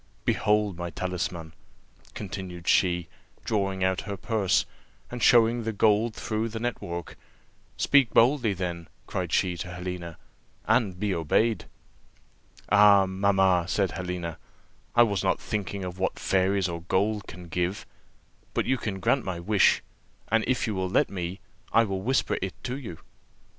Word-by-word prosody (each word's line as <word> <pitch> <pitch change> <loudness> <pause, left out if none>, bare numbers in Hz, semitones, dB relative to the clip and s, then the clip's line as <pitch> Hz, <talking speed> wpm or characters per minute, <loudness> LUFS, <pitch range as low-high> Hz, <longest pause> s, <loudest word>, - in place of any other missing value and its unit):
Behold 105 -3 +1
my 85 0 -3
talisman," 85 -3 -4 0.6
continued 90 -4 -7
she, 90 -3 +3 0.4
drawing 95 -3 0
out 95 0 +1
her 100 -1 -5
purse, 105 -4 +1 0.5
and 125 0 -5
showing 115 +1 +5
the 115 0 -2
gold 110 +2 +2
through 110 +1 -2
the 110 0 -5
net 120 0 -3
work. 85 -1 -6 0.6
"Speak 140 -5 +4
boldly, 120 -1 +4
then," 85 -3 -4 0.2
cried - - -3
she 90 -1 +1
to 90 - -5
Helena, 90 -2 -6 0.5
"and 110 -5 +2
be 105 -1 0
obeyed." 105 +8 +1 1.0
"Ah, 100 -1 +7
mamma," 95 -2 +2
said 95 -1 +1
Helena, 90 -3 -5 0.6
"I 120 - +8
was 100 -4 0
not - - +1
thinking 100 -2 -4
of 90 +1 -7
what 95 - -1
fairies 95 0 +1
or 85 -1 -5
gold 100 +4 0
can 90 0 -10
give; 90 +4 -2 0.7
but - - +1
you 130 -1 +1
can 100 -3 -4
grant 135 +5 +2
my 90 -3 -4
wish, 100 +2 +3 0.5
and 115 +1 +3
if 130 - +1
you 110 - -2
will 95 -1 -2
let - - +2
me, 90 0 -5 0.3
I 115 - +5
will 95 -3 -3
whisper 130 +6 0
it 95 0 -3
to 125 - -3
you." 120 - -7
95 Hz, 155 wpm, -27 LUFS, 90-110 Hz, 1.0 s, I